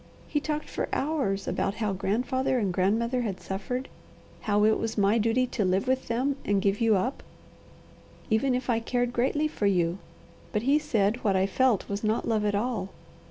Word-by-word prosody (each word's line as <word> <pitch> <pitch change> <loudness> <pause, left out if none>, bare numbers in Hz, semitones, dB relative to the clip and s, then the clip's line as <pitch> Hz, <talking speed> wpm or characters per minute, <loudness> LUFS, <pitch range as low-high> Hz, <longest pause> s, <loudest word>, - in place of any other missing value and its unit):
He 295 - 0
talked 300 0 -3
for - - -3
hours 265 -10 -1
about 195 - -1
how 210 -3 -1
grandfather 250 +7 0
and 200 -6 0
grandmother 230 +7 +1
had 205 -6 -3
suffered, 250 +7 -4 0.5
how 210 -1 +2
it 220 0 +3
was 225 0 -3
my 205 +3 +3
duty 230 +4 +2
to 225 - -2
live 190 +5 +1
with 260 0 0
them 260 +4 0
and 205 -1 +1
give 200 +3 0
you 225 -2 +4
up, 245 +9 -1 1.1
even 250 +4 +2
if 250 0 -3
I 235 -3 +2
cared 245 +1 -1
greatly 280 +5 +1
for 215 -9 -1
you; 175 -1 +1 0.5
but 210 0 -1
he 280 +4 +4
said 235 -6 0
what 200 -3 +2
I 190 0 +3
felt 240 +1 +2
was 200 +1 -4
not 215 +1 0
love 215 -2 +1
at 205 -1 +1
all. 220 -2 -1
225 Hz, 190 wpm, -27 LUFS, 200-255 Hz, 1.1 s, you